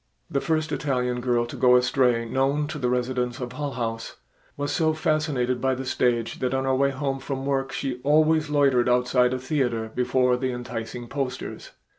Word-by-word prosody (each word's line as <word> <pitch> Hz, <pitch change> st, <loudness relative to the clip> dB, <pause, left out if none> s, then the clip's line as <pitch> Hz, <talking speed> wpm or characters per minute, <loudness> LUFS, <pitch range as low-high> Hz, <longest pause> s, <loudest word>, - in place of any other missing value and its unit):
The 140 Hz, -, 0 dB
first 155 Hz, -1 st, 0 dB
Italian 125 Hz, -3 st, -1 dB
girl 120 Hz, -1 st, +1 dB
to 120 Hz, -, -8 dB
go 125 Hz, -1 st, +5 dB
astray 125 Hz, -1 st, +2 dB
known 135 Hz, +5 st, +1 dB
to 155 Hz, -2 st, -5 dB
the 125 Hz, -2 st, 0 dB
residents 125 Hz, 0 st, -1 dB
of 125 Hz, -1 st, -5 dB
Hull 145 Hz, +1 st, -4 dB
House, 115 Hz, -2 st, -4 dB, 0.4 s
was 145 Hz, 0 st, -2 dB
so 160 Hz, -2 st, +2 dB
fascinated 145 Hz, -6 st, 0 dB
by 130 Hz, 0 st, +1 dB
the 130 Hz, +1 st, -5 dB
stage 120 Hz, -2 st, 0 dB
that 130 Hz, 0 st, 0 dB
on 135 Hz, -, 0 dB
her 135 Hz, 0 st, +1 dB
way 140 Hz, +1 st, +3 dB
home 135 Hz, 0 st, -2 dB
from 135 Hz, 0 st, -4 dB
work 135 Hz, -1 st, -1 dB
she 130 Hz, -2 st, -4 dB
always 155 Hz, +2 st, +3 dB
loitered 135 Hz, -4 st, +3 dB
outside 125 Hz, 0 st, +3 dB
a 130 Hz, -, -1 dB
theater 125 Hz, -5 st, -1 dB
before 125 Hz, 0 st, +2 dB
the 130 Hz, 0 st, -1 dB
enticing 120 Hz, -1 st, -6 dB
posters. 135 Hz, 0 st, -4 dB
130 Hz, 185 wpm, -25 LUFS, 125-140 Hz, 0.4 s, go